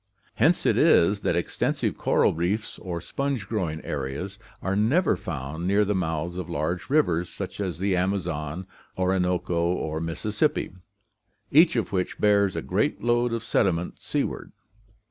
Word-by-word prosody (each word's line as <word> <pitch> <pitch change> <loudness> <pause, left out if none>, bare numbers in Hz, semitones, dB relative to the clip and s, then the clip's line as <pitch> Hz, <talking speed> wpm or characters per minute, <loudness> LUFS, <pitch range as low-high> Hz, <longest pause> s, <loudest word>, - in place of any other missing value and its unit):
Hence - - +3
it - - +3
is 100 +5 +5
that 85 - 0
extensive 85 - -1
coral - - +2
reefs 90 +7 -2
or 85 -2 -5
sponge 135 - -3
growing 85 -8 -2
areas 70 +9 -4 0.2
are 95 0 -1
never 130 - +3
found 80 +6 -5
near 100 +2 +3
the 105 - +1
mouths 85 -1 -2
of 90 -3 -5
large 90 - -2
rivers 90 - +2
such - - -6
as 95 -4 -2
the 95 +1 +1
Amazon, 90 -3 -2 0.3
Orinoco, 90 -2 +1
or 80 -2 -1
Mississippi, 105 - -1 0.8
each 160 +2 +6
of 115 -2 -1
which 90 -2 -1
bears 100 -2 +3
a - - -3
great - - 0
load 120 0 +2
of 115 -1 -2
sediment 90 -6 0
sea - - 0
ward. - - -6
95 Hz, 150 wpm, -26 LUFS, 85-105 Hz, 0.8 s, each